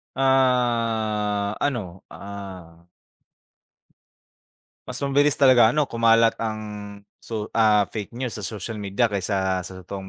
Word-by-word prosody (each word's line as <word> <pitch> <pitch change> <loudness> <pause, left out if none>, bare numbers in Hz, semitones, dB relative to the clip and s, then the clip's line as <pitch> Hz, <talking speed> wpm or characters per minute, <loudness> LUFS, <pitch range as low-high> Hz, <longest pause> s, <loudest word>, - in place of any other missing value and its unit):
Ah, 115 -6 +1
ano, 105 -11 -3
ah 95 -4 -10 2.0
Mas - - -5
mabilis 145 +1 +2
talaga 130 -5 +6
ano 150 +1 +2
kumalat 115 -2 +3
ang 110 -1 -3 0.6
so, 110 -2 -5
ah, 105 -2 +4
fake 110 +2 -6
news 125 -2 -3
sa 105 - -6
social 105 +1 -5
media 100 +3 0
kaysa 95 -1 -1
sa 90 - -8
totoong 95 +1 -7
110 Hz, 115 wpm, -23 LUFS, 100-120 Hz, 2.0 s, talaga